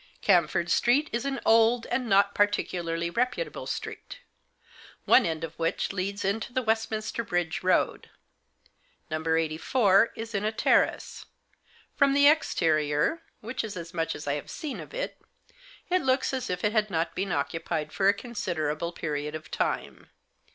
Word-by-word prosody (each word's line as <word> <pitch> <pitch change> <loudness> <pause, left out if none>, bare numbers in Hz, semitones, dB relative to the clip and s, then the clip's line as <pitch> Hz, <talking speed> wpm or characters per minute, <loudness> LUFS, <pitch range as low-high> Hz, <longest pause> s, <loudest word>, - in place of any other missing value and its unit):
Camford 170 0 +2
Street 275 +6 +3
is 235 +3 -1
an 275 -1 -2
old, 230 +1 +4
and 240 -1 -1
not 200 0 +4
particularly 170 -5 0
reputable 250 - -2
street, - - -6 0.9
one 260 - +5
end 160 0 -3
of 165 -1 -5
which 165 +3 -1
leads 195 +1 -3
into 210 +5 -1
the 255 +1 -1
Westminster 220 0 -1
Bridge 175 -5 -2
Road. 185 0 +1 1.0
No. 155 0 -2
84 190 +7 +3
is 225 +1 -7
in 200 0 -1
a 215 - +1
terrace. 220 - +1 0.7
From 280 -1 +3
the 285 0 +6
exterior 160 - +2
— - - -44
which 230 +3 -4
is 210 -3 -6
as 170 -1 -8
much 165 -1 -1
as 145 - -8
I 140 - 0
have 145 - -5
seen 300 -4 -5
of - - -10
it - - -4 0.3
— - - -24
it 365 0 +3
looks 260 +1 +1
as 260 -1 -3
if 180 0 -3
it 210 - +2
had 215 -1 +1
not 165 -2 -1
been 195 0 -2
occupied 155 +1 -2
for 195 - +2
a - - +5
considerable 170 -8 -3
period 150 -2 -4
of 155 0 -9
time. - - -3
200 Hz, 165 wpm, -27 LUFS, 165-240 Hz, 1.0 s, the